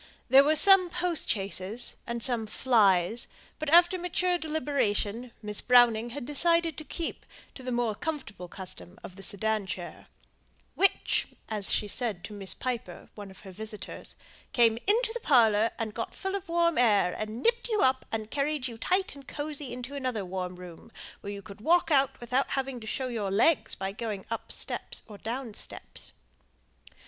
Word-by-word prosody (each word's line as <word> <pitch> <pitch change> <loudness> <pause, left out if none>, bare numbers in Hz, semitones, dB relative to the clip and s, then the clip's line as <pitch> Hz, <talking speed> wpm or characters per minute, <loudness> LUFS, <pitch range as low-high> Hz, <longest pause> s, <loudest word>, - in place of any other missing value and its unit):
There 270 +1 +8
were 305 +2 +3
some 385 +1 +7
postchaises, 235 - -1
and 235 -1 -3
some 235 -4 +4
"flys," 210 -3 +3 0.3
but 310 -2 -2
after 345 +3 +6
mature 360 0 0
deliberation 250 -7 -1
Miss 210 0 -2
Browning 240 -2 +5
had 245 +1 -6
decided 335 +3 +2
to - - -7
keep 330 +2 -5 0.3
to - - -10
the 255 0 -4
more 240 -2 0
comfortable 260 - -5
custom 185 +1 -7
of 185 - -9
the 195 - -11
sedan 205 +1 0
chair; 175 -2 -7 0.7
"which," 390 - +2 0.2
as 210 -3 0
she 210 - 0
said 210 -4 -2
to 215 - -7
Miss 195 -2 +3
Piper, 250 -2 -5
one 205 -2 -9
of 190 - -14
her 195 - -10
visitors, 210 0 -7 0.4
"came 230 -2 +4
into 450 +3 +3
the 480 - -4
parlour, 225 - +4
and 220 -2 -3
got 230 - -5
full 385 0 -3
of 395 -3 -4
the - - -8
warm 335 -2 +2
air, 205 -7 +4
and 215 +3 -5
nipped 470 +1 +1
you 430 -2 +1
up, 260 0 +3
and 220 -1 -4
carried 285 -1 -1
you 230 -2 -9
tight 370 +8 0
and 280 -1 -13
cosy 290 -2 -4
into 250 +2 -7
another 255 -7 -3
warm 180 0 -4
room, 180 +4 -12 0.3
where 200 - -7
you 200 -1 -7
could 200 +2 -12
walk 335 +5 +3
out 275 -2 +3
without 250 +3 0
having 270 -2 -2
to 220 - -10
show 260 +3 -2
your 220 -5 -2
legs 240 +11 +2
by 195 0 -3
going 210 -2 -5
up 230 - -4
steps, - - -4
or 210 -2 -11
down 235 0 -5
steps." - - -10
240 Hz, 175 wpm, -28 LUFS, 210-300 Hz, 0.7 s, There